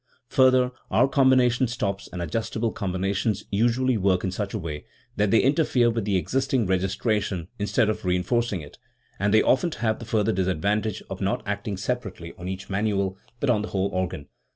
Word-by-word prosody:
Further, 130 -1 +4 0.2
our - - +4
combination 130 -2 +4
stops 100 -4 -3
and 90 -1 -4
adjustable 110 +6 -2
combinations 95 +2 -1
usually 120 +4 +2
work 95 -2 +2
in 95 - -1
such 100 +1 -3
a - - +1
way 80 -6 -6 0.3
that 105 0 +2
they 115 - +5
interfere 135 -4 +3
with 115 -3 -2
the 100 -2 +1
existing 130 +4 0
registration 95 -1 -1
instead 105 +2 +2
of 110 - -2
reinforcing 90 +3 0
it; 75 - -13 0.4
and 100 +2 +1
they 110 - +5
often 170 +7 +3
have 110 -2 -1
the 115 - -8
further 110 -2 +1
disadvantage 95 +3 0
of 95 - -7
not 100 +1 0
acting 100 0 -3
separate 105 -1 -3
ly 85 0 -8
on 90 - -6
each 95 +1 -5
manual, 100 -1 -1 0.2
but 140 - +2
on 105 -3 +2
the 105 - -4
whole 95 -1 -1
organ. 95 -5 -3
105 Hz, 180 wpm, -25 LUFS, 95-120 Hz, 0.4 s, they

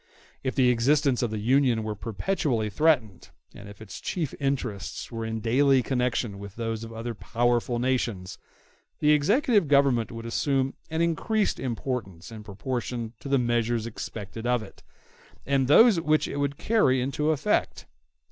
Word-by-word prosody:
If 130 - -3
the 130 -2 +4
existence 135 +2 +2
of 120 - 0
the 110 - -4
Union 120 +1 +2
were 110 0 -3
perpetually 115 - -2
threatened, 125 - +1 0.2
and 100 0 -11
if 105 +1 -11
its 105 - -10
chief 160 -7 -3
interests 130 -9 -3
were 115 -1 -4
in 110 0 -4
daily 130 +3 +3
connection 125 -5 -1
with 100 0 -9
those 115 -1 -3
of 115 - -8
other 115 +1 -5
powerful 120 +2 0
nations, 120 -7 -2 0.6
the 150 - +3
executive 205 - +3
government 140 -5 +3
would 115 0 -7
assume 135 +3 0 0.2
an 160 +1 0
increased 205 +6 0
importance 115 -8 -4
in 110 -1 -9
proportion 115 +2 -4
to 140 - -8
the 140 - +3
measures 120 -2 0
expected 115 0 -6
of 125 -2 +1
it, 100 - -14 0.6
and 135 -2 +1
those 200 - +6
which 155 -1 +2
it - - -5
would 140 0 -1
carry 210 - +2
into 140 +4 -1
effect. 155 -3 0
125 Hz, 155 wpm, -26 LUFS, 115-140 Hz, 0.6 s, those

